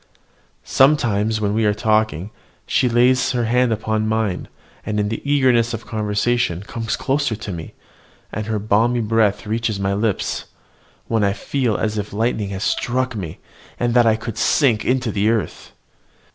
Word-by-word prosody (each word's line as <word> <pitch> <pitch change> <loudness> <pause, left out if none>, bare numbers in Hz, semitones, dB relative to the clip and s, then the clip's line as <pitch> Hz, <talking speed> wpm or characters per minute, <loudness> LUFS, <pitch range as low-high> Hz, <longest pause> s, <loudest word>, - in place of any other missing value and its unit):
Sometimes 110 -7 +2
when 105 -1 0
we 110 +1 +1
are 105 -1 +2
talking 110 -4 0 0.3
she 130 -2 +2
lays 125 +2 +3
her 120 -2 0
hand 125 +1 +2
upon 110 0 -1
mine, 110 -4 -1 0.4
and 105 0 -2
in 105 0 0
the 115 - -4
eagerness 120 -5 +3
of 115 - -9
conversation 105 -3 0
comes 115 +1 -3
closer 135 -4 0
to 105 -1 -6
me, 85 -3 -7 0.6
and 110 0 -4
her 110 -1 -1
balmy 110 +4 +2
breath 110 -2 +1
reaches 110 -1 -1
my 100 0 0
lips, 105 0 -1 0.6
when 110 -2 0
I 100 -1 +2
feel 120 -1 -1
as 110 -1 -1
if 100 0 -5
lightning 110 -1 -1
had 95 0 -4
struck 125 +2 -1
me, 90 -7 -5 0.4
and 120 -1 +1
that 120 -1 +5
I 110 - +4
could 115 0 -6
sink 120 -8 +3
into 125 -2 0
the 105 +2 +1
earth. 115 -3 -2
110 Hz, 165 wpm, -20 LUFS, 105-120 Hz, 0.6 s, that